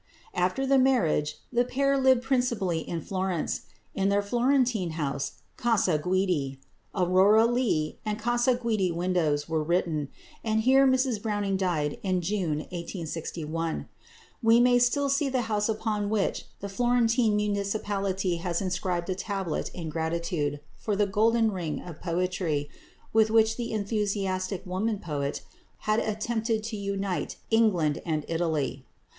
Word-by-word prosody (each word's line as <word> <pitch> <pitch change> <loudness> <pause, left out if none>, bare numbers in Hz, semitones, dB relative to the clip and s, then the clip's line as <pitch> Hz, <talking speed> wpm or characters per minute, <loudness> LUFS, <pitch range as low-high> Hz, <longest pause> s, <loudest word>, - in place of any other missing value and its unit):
After 185 +9 0
the 270 0 +4
marriage 165 - +2 0.2
the 240 +1 +4
pair 275 +3 +1
lived 260 -2 +4
principally 235 -11 0
at 165 -3 -3
Florence. 185 -3 -2 0.3
In 195 0 +1
their 200 0 +2
Florentine 240 - +1
home 140 -4 -2 0.4
Casa 205 -9 +2
Guidi 180 -6 0 0.4
"Aurora 190 +4 +5
Leigh," 235 -11 0
and 210 -1 -2
"Casa 240 +2 +2
Guidi 220 -7 0
Windows" 170 -4 0
were 160 -1 0
written, 160 -3 0 0.3
and 220 -1 +1
here 265 +3 +5
Mrs 260 -4 +2
Browning 205 -3 -1
died 170 -6 -1
in 185 -2 0
June 170 -5 -1
1861. 165 -2 -4 0.5
One 230 +1 +5
may 245 0 +5
still 260 +4 +2
see 275 +1 +1
the 260 -1 +1
house 210 -1 0
upon 215 -2 -1
which 210 -2 0 0.2
the 200 - -4
Florentine 235 +1 +2
municipality 200 -3 -1
has 170 0 -2
inscribed 180 -2 -2
a - - +2
tablet 195 -3 -3
in 165 -3 -6
gratitude 160 -2 -2 0.2
for 210 - -2
the 205 +1 +3
"golden 220 +3 +2
ring" 175 -5 -3
of 170 -3 -10
poetry 170 -4 -1 0.4
with 220 0 +5
which 220 0 +4
the 235 -1 -4
enthusiastic 200 -3 -1
woman 200 +4 -1
poet 145 -6 -3 0.4
had 215 +1 +3
attempted 220 +1 -1
to 220 0 -4
unite 200 -2 -2 0.2
England 190 -10 +3
and 155 -2 -2
Italy. 155 -6 -1
195 Hz, 140 wpm, -27 LUFS, 170-225 Hz, 0.5 s, Aurora